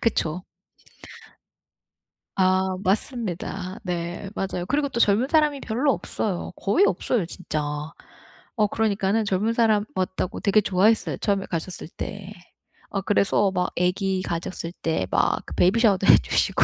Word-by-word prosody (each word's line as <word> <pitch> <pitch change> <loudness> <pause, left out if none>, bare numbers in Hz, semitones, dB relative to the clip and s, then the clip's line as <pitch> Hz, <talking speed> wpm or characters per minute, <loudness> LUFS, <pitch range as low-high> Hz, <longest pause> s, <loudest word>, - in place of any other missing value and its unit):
그쵸. 180 -6 0 1.9
아. 185 0 +2
맞습니다. 195 -2 -2
네. 175 +1 -4
맞아요. 185 -2 -3
그리고 285 +1 +1
또 235 - -3
젊은 215 +4 +3
사람이 300 -2 +2
별로 255 +5 +1
없어요. 195 -8 -3
거의 345 - +2
없어요 230 - 0
진짜. 165 -2 -4 1.0
어 210 -3 +3
그러니까는 215 0 0
젊은 205 +3 0
사람 220 -3 +3
왔다고 185 -1 -2
되게 210 +1 +3
좋아했어요 205 +4 +2
처음에 200 -2 0
갔었을 170 -1 -4
때. 200 +3 -7 0.6
어 195 - -2
그래서 200 0 +2
막 180 -1 -1
애기 185 +1 0
가졌을 170 -1 -4
때 160 - -1
막 - - +1
그 - - -8
베이비 190 +6 +3
샤워도 200 -4 +3
해 - - +9
주시고. - - +1
195 Hz, 295 characters per minute, -24 LUFS, 185-220 Hz, 1.9 s, 해